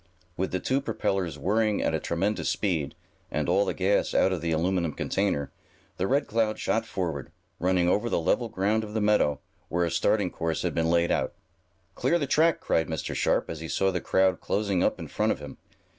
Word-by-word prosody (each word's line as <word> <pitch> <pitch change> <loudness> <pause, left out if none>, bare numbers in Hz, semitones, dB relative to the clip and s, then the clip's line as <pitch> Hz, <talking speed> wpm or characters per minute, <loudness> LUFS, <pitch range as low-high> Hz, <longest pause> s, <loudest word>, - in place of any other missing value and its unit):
With 95 +2 -2
the 95 - -1
two 130 +8 0
propellers 95 - -1
whirring 105 +6 +1
at - - +1
a - - +1
tremendous 100 +5 -1
speed, 85 -9 -1 0.3
and - - -1
all 100 - +3
the - - -1
gas 95 +2 +1
out 95 - +4
of 90 - -3
the 85 0 -1
aluminum 85 0 0
container, 95 -7 -1 0.5
the 95 - 0
Red 140 +4 +2
Cloud 110 -1 0
shot 115 0 0
forward, 85 - -3 0.3
running 90 0 +2
over 105 +6 +1
the - - +1
level 105 +8 +1
ground 105 +2 0
of 105 0 -8
the - - +2
meadow, 105 -9 +2 0.3
where 85 +1 +1
a 85 - -2
starting 90 +3 +1
course 85 -1 -2
had - - -1
been 80 0 +1
laid 85 0 +2
out. - - 0 0.6
"Clear 170 - +1
the 150 - -1
track!" 160 +4 +3
cried 80 - +1
Mr. 80 -1 -3
Sharp, - - +1
as 80 - -6
he 80 - -6
saw 95 +3 +1
the 90 -2 -2
crowd 95 0 +2
closing 100 -3 0
up - - +1
in - - -7
front - - 0
of - - -1
him. - - -9
95 Hz, 210 wpm, -27 LUFS, 85-105 Hz, 0.6 s, out